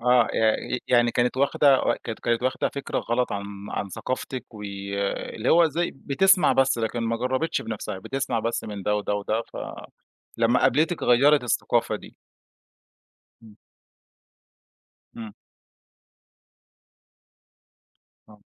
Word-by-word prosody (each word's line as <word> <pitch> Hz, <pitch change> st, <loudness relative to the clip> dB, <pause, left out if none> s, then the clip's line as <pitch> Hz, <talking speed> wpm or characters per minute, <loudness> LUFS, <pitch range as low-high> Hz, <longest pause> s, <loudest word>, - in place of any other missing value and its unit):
آه، 125 Hz, 0 st, +4 dB
ي 110 Hz, +2 st, +1 dB
ي -, -, -7 dB
يعني 120 Hz, -1 st, +4 dB
كانت 120 Hz, +2 st, 0 dB
واخدة 140 Hz, 0 st, +4 dB, 0.2 s
ك -, -, -5 dB
كانت 120 Hz, +1 st, -1 dB
واخده 130 Hz, -, 0 dB
فكرة 140 Hz, -, -4 dB
غلط 125 Hz, +1 st, -1 dB
عن 100 Hz, -1 st, -3 dB, 0.3 s
عن 100 Hz, -, -3 dB
ثقافتِك 130 Hz, +2 st, -5 dB
واللي 100 Hz, +2 st, -4 dB
هو 170 Hz, 0 st, +6 dB
زي 170 Hz, +4 st, -1 dB
بتسمع 180 Hz, +8 st, +3 dB
بس 135 Hz, -2 st, +2 dB
لكن 115 Hz, +1 st, -2 dB
ما 115 Hz, 0 st, -1 dB
جرّبِتش 130 Hz, +7 st, -1 dB
بنفسها، 105 Hz, -3 st, -5 dB
بتسمع 125 Hz, +1 st, -2 dB
بس 115 Hz, +1 st, -2 dB
من 100 Hz, -2 st, -6 dB
ده، 105 Hz, -, +1 dB
وده، 105 Hz, 0 st, -2 dB
وده 105 Hz, +3 st, -1 dB
ف -, -, -14 dB, 0.8 s
لمّا 115 Hz, +2 st, +3 dB
قابلتِك 160 Hz, +3 st, +2 dB
غيّرِت 140 Hz, +3 st, +4 dB
الثقافة 120 Hz, -, 0 dB
دي. -, -, -14 dB, 1.3 s
إمم. 110 Hz, -2 st, -16 dB, 1.6 s
إمم. 110 Hz, -3 st, -8 dB, 3.0 s
آه. 105 Hz, -1 st, -18 dB
120 Hz, 125 wpm, -25 LUFS, 110-135 Hz, 3.0 s, هو